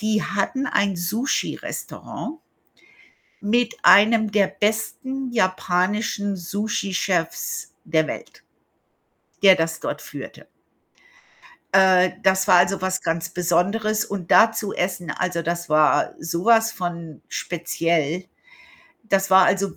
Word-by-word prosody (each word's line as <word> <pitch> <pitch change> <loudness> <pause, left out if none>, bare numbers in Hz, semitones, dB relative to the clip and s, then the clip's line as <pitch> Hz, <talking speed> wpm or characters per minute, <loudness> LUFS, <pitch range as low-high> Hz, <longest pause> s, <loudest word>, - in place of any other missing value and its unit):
die 215 0 0
hatten 205 +8 -2
ein 200 -2 0
Sushirestaurant 230 - -4 1.0
mit 230 +3 0
einem 215 +3 +5
der 200 -3 +3
besten 250 +5 -3
japanischen 200 0 0
Sushi-Chefs 190 -2 -3
der 160 -1 +1
Welt, - - -8 1.0
der 190 -1 +8
das 165 0 -2
dort - - -5
führte. - - -10 1.3
Äh, 185 -1 +5
das 190 0 +2
war, - - +7
also, 180 +2 +3
was 185 0 -1
ganz 165 0 -2
Besonderes 195 +5 0
und 190 -4 -6
da 225 - +7
zu 215 -3 -4
essen, 175 -2 -3
also, 175 -1 -2
das 170 +1 -3
war 155 0 +3
so 170 +4 -4
was 225 -1 +4
von 170 -4 -6
speziell. 170 -1 -2 0.8
Das 195 -3 0
war, 190 0 +7
also, 195 0 0
190 Hz, 110 wpm, -22 LUFS, 175-215 Hz, 1.3 s, der